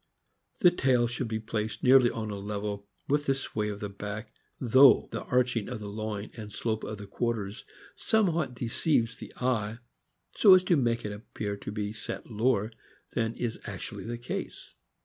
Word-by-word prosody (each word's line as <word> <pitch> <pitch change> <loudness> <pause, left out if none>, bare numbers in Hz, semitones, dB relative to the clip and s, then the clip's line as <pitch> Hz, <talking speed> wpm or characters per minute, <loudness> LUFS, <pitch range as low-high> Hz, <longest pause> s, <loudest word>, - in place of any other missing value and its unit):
The 180 - +8
tail 130 -7 +3
should 120 +1 -2
be 110 0 -2
placed 110 0 -3
nearly 130 -1 +7
on 110 -2 -4
a 100 - -4
level 100 0 -4 0.2
with 145 +1 +1
the 135 - +3
sway 105 -5 -2
of 105 -1 -6
the 105 - -2
back, 105 +2 -6 0.3
though 130 +2 +6
the - - -3
arching 125 -3 +1
of 125 -3 -4
the 105 -1 -6
loin 105 0 -4
and 110 -3 -7
the - - -11
slope 110 -2 -1
of 110 - -5
the 100 - -8
quarters 105 -1 -3 0.3
somewhat 170 - +1
deceives 120 0 +1
the - - -9
eye, 115 -4 0 0.6
so 195 -3 +8
as 185 - +4
to 180 -1 +3
make 120 -5 +1
it 105 - -2
appear 105 -1 -5
to 100 - -6
be 105 0 -3
set 110 - -6
lower 110 -1 +1 0.4
than 115 0 0
is 120 -2 -3
actually - - -6
the 120 +1 -4
case. 120 +1 -6
115 Hz, 185 wpm, -29 LUFS, 105-125 Hz, 0.6 s, The